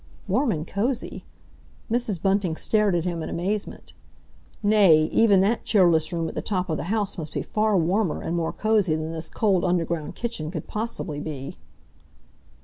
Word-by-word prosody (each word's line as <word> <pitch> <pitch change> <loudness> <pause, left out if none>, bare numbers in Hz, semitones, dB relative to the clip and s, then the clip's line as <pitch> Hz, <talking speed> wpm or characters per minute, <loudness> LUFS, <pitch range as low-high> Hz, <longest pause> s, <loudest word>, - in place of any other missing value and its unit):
Warm 275 -5 +2
and 155 -4 -3
cosy? 235 +5 -2 0.7
Mrs. 230 -6 0
Bunting 195 -2 +1
stared 210 +1 +2
at 170 - 0
him 170 -2 -2
in - - -4
amazement. 200 +4 -4 0.7
Nay, 200 -7 +6
even 205 -4 +5
that 215 +4 +1
cheerless 170 -6 +3
room 165 -2 -1
at - - -6
the - - -3
top 185 -4 -2
of 155 - 0
the - - -4
house 205 -1 -1
must 155 -2 -6
be - - -2
far 215 -1 +1
warmer 180 +1 +1
and 170 - -3
more 165 -1 -1
cosy 210 -7 +1
than 155 +1 -3
this 160 0 -5
cold 195 -5 +1
underground 170 -3 -1
kitchen 235 -11 -4
could 160 -3 -5
possibly 210 -9 -4
be. 145 -3 -6
185 Hz, 170 wpm, -24 LUFS, 160-210 Hz, 0.7 s, Nay